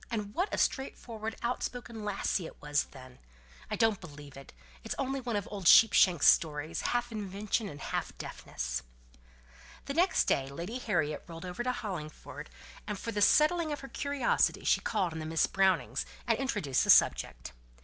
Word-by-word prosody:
And 210 -3 -3
what 370 - -1
a - - -1
straightforward, 225 -5 -2
out 240 +1 -1
spoken 235 -3 -5
topic 205 -1 -1
it 165 - -9
was 145 0 0
then! 130 -2 -14 0.5
I - - -1
don't 225 -3 +2
believe 145 -5 -11
it; 135 -1 -12 0.3
it's - - -4
only 270 0 -1
one 240 -3 -3
of 205 - -2
old 195 -4 -3
Sheepshanks' 185 -7 +7
stories, 155 0 +3
half 240 0 -1
invention 205 +1 -2
and 145 - -9
half - - -4
deafness." - - -5 1.0
The 280 - -3
next 350 +5 +3
day 135 0 0
Lady 175 - -5
Harriet 170 -11 -1
rode 165 +1 -8
over 180 +5 -5
to 250 +1 0
Hollingford, 185 -11 -7 0.4
and 210 -2 -3
for 230 - -5
the 205 -1 -2
settling 310 +7 +4
of 295 - -4
her 270 - -8
curiosity 285 -4 0
she - - +3
called 190 -6 -1
on 160 -1 -5
Miss 160 0 +3
Brownings, 190 -1 +1 0.2
and - - +1
introduced 205 - 0
the - - -3
subject. - - +4
205 Hz, 170 wpm, -31 LUFS, 160-240 Hz, 1.0 s, Sheepshanks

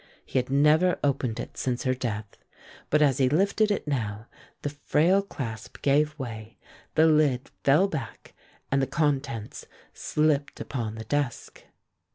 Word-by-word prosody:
He - - 0
had 125 - -3
never 150 +6 +4
opened 130 -5 0
it - - -7
since 125 0 -2
her 130 -2 +2
death, 110 -5 -4 0.5
but 150 0 +4
as 135 -3 +2
he 130 -1 +4
lifted 200 +7 +2
it 205 - -1
now 110 -6 -2 0.4
the 145 - -2
frail 160 +6 +2
clasp 115 - -7
gave 150 +2 +2
way, 110 -4 -7 0.4
the 160 - +6
lid 150 -5 +2
fell 150 +8 +5
back, 155 -8 -7 0.4
and 135 0 +3
the 135 - 0
contents 135 -8 -2 0.3
slipped 150 -2 0
upon 115 -5 -4
the 110 - -6
desk. 140 +1 -3
140 Hz, 150 wpm, -27 LUFS, 125-150 Hz, 0.5 s, the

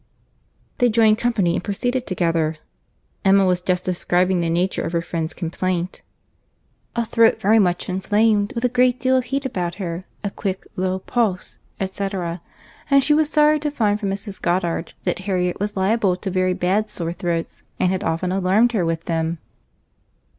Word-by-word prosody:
They 245 - +4
joined 220 -1 +4
company 215 -8 +1
and - - -2
proceeded 245 +5 -2
together. 165 -4 0 0.7
Emma 195 0 +5
was 180 -1 +2
just 180 0 0
describing 180 0 +1
the 170 -1 0
nature 175 +3 0
of - - -4
her 170 - +1
friend's 165 -1 -3
complaint;—"a 185 +6 -6
throat 230 0 +3
very 220 +3 +4
much 180 -3 +1
inflamed, 205 +2 +1
with 235 +1 -1
a - - +3
great 250 0 +2
deal 260 +1 +2
of 255 -1 +1
heat 275 +1 -2
about 180 -8 -2
her, 180 -2 -5 0.2
a 200 - -2
quick, 195 -2 -4
low 185 0 -1
pulse, 195 -1 -2 0.2
&c. 195 +1 -3 0.9
and 275 -1 +5
she 300 - +4
was 305 0 +3
sorry 300 0 +4
to 300 0 -1
find 215 -7 0
from 200 -2 -2
Mrs. 195 0 -5
Goddard 175 -1 -1
that - - -1
Harriet 180 -2 0
was 205 0 -2
liable 195 -1 +2
to 190 +1 -5
very 185 0 +1
bad 200 +5 0
sore 170 -1 -3
throats, 170 -2 -3 0.2
and 180 - +2
had 190 - -2
often 165 +3 -1
alarmed 195 +5 +3
her 210 -7 0
with 165 0 -2
them." 165 0 -1
190 Hz, 170 wpm, -21 LUFS, 180-225 Hz, 0.9 s, Emma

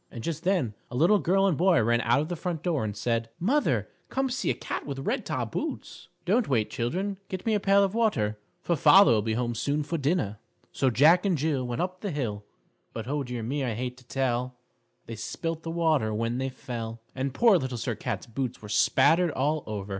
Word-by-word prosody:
And 115 -3 -8
just 165 -1 -3
then 175 - +1 0.2
a - - -7
little 175 +10 +4
girl 190 +5 +2
and 190 -5 +2
boy 175 +2 +4
ran 120 +1 +2
out 120 +5 +2
of 155 - -3
the 175 - -3
front 170 -2 -4
door, 165 -9 0
and 105 -1 -4
said: 115 0 -1
"Mother, 270 - +1 0.2
come 265 -1 -1
see 255 - -1
a - - +1
cat - - -5
with 140 -2 -5
red - - -1
top - - -2
boots!" - - -5 0.2
"Don't 220 +4 +2
wait, 115 -6 0
children. 185 +12 -2
Get 185 -1 -5
me 225 - +2
a 210 - +2
pail 200 0 +4
of 195 0 0
water, 110 - 0 0.2
for 170 - +1
father 165 +1 +7
will 110 -2 +3
be 110 +1 -1
home 120 0 -1
soon 145 +6 -1
for 165 +2 -3
dinner." 140 - 0 0.3
So 135 - +1
Jack 155 +9 +5
and 190 -5 +1
Jill 140 -3 -1
Went 120 +3 -2
up 185 0 -5
the 205 - -3
hill 115 - -3 0.5
But, 115 0 -6
oh, 145 +2 -1
dear 120 -2 -5
me, 135 +5 -2
I 120 -4 -2
hate 125 +2 -4
to 130 - -17
tell 125 -1 -1 0.5
They 115 - -7
spilt 165 +9 -4
the 165 - -6
water 160 -9 +1
when 115 +3 -1
they 135 0 -1
fell. 115 -3 -6
And 135 +1 -2
poor 210 - +5
Little 130 -3 -4
Sir 120 +1 -2
Cat's 110 -1 -4
boots 125 +1 -4
were 105 - -11
spattered 165 +10 +4
all 150 +1 0
over. 105 -2 -5
135 Hz, 225 wpm, -27 LUFS, 120-175 Hz, 0.5 s, father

